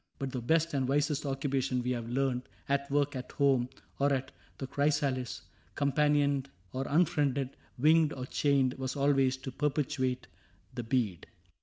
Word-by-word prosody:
But 135 -1 -3
the 125 - -3
best 160 +6 +2
And 135 -2 +1
wisest 145 +1 +1
occupation, 135 -2 -1
we 125 - -1
had 120 -2 -3
learned, 125 0 -1
— - - -29
At 140 0 0
work, 145 0 +1
at 125 -1 -6
home, 135 -3 +2 0.3
or 140 +1 +3
at 135 -1 -1
" - - -31
The 135 - -4
Chrysalis," 140 -2 0 0.3
Companioned 140 -1 +2 0.2
or 135 +1 -2
unfriended, 140 -4 +2 0.3
winged 155 +3 +4
or 130 -1 -5
chained, 135 -1 +2
— - - -13
Was 130 +1 -3
always 135 -2 +3
to 130 0 -7
perpetuate 130 -3 -1 0.5
the 120 - -3
bead. 115 - -1
135 Hz, 165 wpm, -31 LUFS, 130-145 Hz, 0.5 s, winged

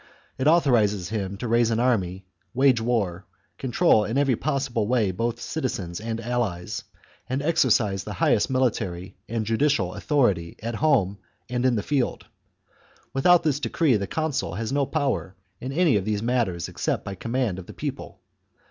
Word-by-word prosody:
It 130 - +1
authorises 115 - +3
him 100 -3 -3
to 115 - -5
chap. 115 - -3
raise 115 -1 +4
an 115 0 0
army, 95 -7 0 0.3
wage 130 -3 +4
war, 100 -6 -1 0.3
control 120 -4 +3
in 110 +5 -2
every 140 -3 +3
possible 135 -6 -1
way 115 -5 +2
both 115 +5 -2
citizens 100 - -3
and 115 0 -3
allies, 115 -7 -2 0.5
and 130 +2 0
exercise 120 - +2
thehighest 105 0 +1
military 100 -8 -1
and 115 -2 -2
judicial 115 -4 +1
authority 100 - +1
at 115 +1 -3
home 105 -11 +2 0.3
and 125 +1 +1
in 125 - +2
the 105 - -1
field. 140 -4 -1 0.9
Without 175 +6 +5
this 145 -3 +1
decree 150 -3 +2
the 100 -2 -1
consul 145 - -2
has 115 +4 -3
no 140 -1 +1
powers 125 - -1 0.3
in 130 - -5
any 160 -3 +3
of 95 - -2
these 105 0 -1
matters 115 -8 0
except - - -2
by 100 - -4
command 115 -1 -2
of 90 - -10
the - - -8
people. - - -6
115 Hz, 165 wpm, -25 LUFS, 100-130 Hz, 0.9 s, Without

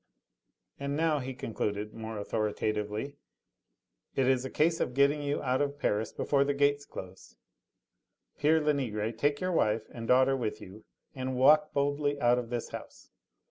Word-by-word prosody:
"And 140 0 -2
now," 160 -2 +2
he 130 0 -5
concluded 105 -2 -3
more 110 -1 -6
authoritatively, 105 +4 -2 1.0
"it 135 - +2
is 130 -1 +3
a 130 - -4
case 165 +4 +2
of 125 - -2
getting 140 +1 +2
out 130 +1 0
of 145 0 -1
Paris 110 -6 0
before 140 -1 +1
the 140 0 -1
gates 145 0 +2
close. 95 0 -10 1.0
Pere 155 +2 +4
Lenegre, 125 -8 0
take 145 +5 0
your 185 0 -1
wife 110 -9 +2
and 115 -1 -6
daughter 130 +2 +4
with 120 -5 -3
you 105 +4 -12 0.3
and 130 0 -3
walk 150 +4 +5
boldly 145 0 0
out 120 -1 +4
of 120 -2 -6
this 120 -1 -3
house. - - -10
130 Hz, 155 wpm, -30 LUFS, 110-145 Hz, 1.0 s, walk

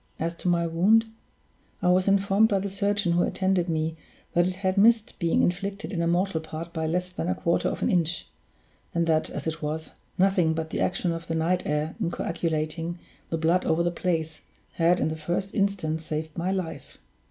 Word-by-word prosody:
As 165 +1 -1
to - - -5
my 170 -1 +3
wound, 190 +8 +4 0.7
I 180 - +2
was 185 +1 +3
informed 200 +2 +4
by 200 - +2
the 195 +1 -2
surgeon 200 -1 0
who 175 +1 +3
attended 190 -2 +1
me 160 0 -1 0.4
that 175 +1 +4
it 185 - -3
had 190 0 -1
missed 220 +2 +4
being 170 -1 +2
inflicted 195 +3 -2
in 170 - -1
a 170 - +1
mortal 175 -1 +1
part 160 +1 -7
by 160 0 -1
less 180 +3 -1
than 180 -1 -3
a - - +1
quarter 170 - +1
of - - -4
an - - +2
inch, 170 -2 +1 0.7
and 170 0 +2
that, 160 -1 +2
as - - -5
it 160 0 -3
was, 155 +1 -4 0.3
nothing 185 -4 +3
but 160 0 -3
the - - -2
action 180 -1 0
of 165 0 -5
the 165 - -2
night 175 +3 +1
air 150 +2 -1
in 175 - +1
coagulating 165 0 -2 0.3
the 165 - -1
blood 165 +3 +2
over 165 +1 +2
the 175 - +1
place, 165 -3 -2 0.3
had, 170 +1 +3
in - - +1
the 160 - -3
first 175 +5 -3
instance, 185 -6 0
saved 155 0 -4
my 180 +2 -1
life. 185 -4 -4
170 Hz, 205 wpm, -26 LUFS, 160-190 Hz, 0.7 s, wound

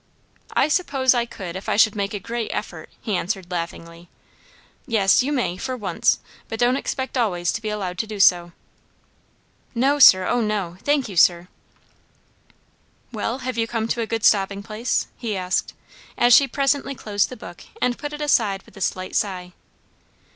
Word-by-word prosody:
"I - - +4
suppose 280 -6 +2
I 240 -1 0
could 180 -6 -8
if 190 - -6
I - - +1
should 220 -1 +5
make 200 0 -2
a - - -3
great 230 +3 -4
effort," - - -6
he 215 -4 -2
answered 185 0 -3
laughingly. 170 0 -6 0.8
"Yes, 210 -4 +4
you 270 +4 -2
may, 245 -10 -1
for 255 +5 -4
once, 210 - +1 0.3
but 225 - -5
don't 245 +1 +3
expect 265 -1 -3
always 175 -7 0
to 225 - -4
be 215 - -3
allowed 190 -4 -4
to 220 - -2
do 210 -1 -7
so." 175 -2 +4 1.2
"No, 275 +5 +2
sir, 185 -8 +8
oh, 245 0 +1
no. 205 -5 -2
Thank 285 -3 +1
you, 200 - -8
sir." 175 +1 +4 1.6
"Well, 230 +2 -3
have 255 -2 -3
you 225 - +1
come 225 -1 -2
to 235 - -1
a 225 - -2
good 225 -1 -3
stopping 200 -1 +3
place?" 220 +3 -1
he 220 -5 -3
asked, 185 0 -2 0.4
as 240 0 +5
she 275 +3 +7
presently 275 +1 0
closed 205 -4 -1
the 255 - -9
book 175 -5 -11 0.2
and 250 -1 +1
put 290 - -5
it 300 0 -7
aside 215 -9 +1
with - - -20
a 195 - -11
slight 185 0 -2
sigh. 180 -3 -2
215 Hz, 180 wpm, -22 LUFS, 185-245 Hz, 1.6 s, sir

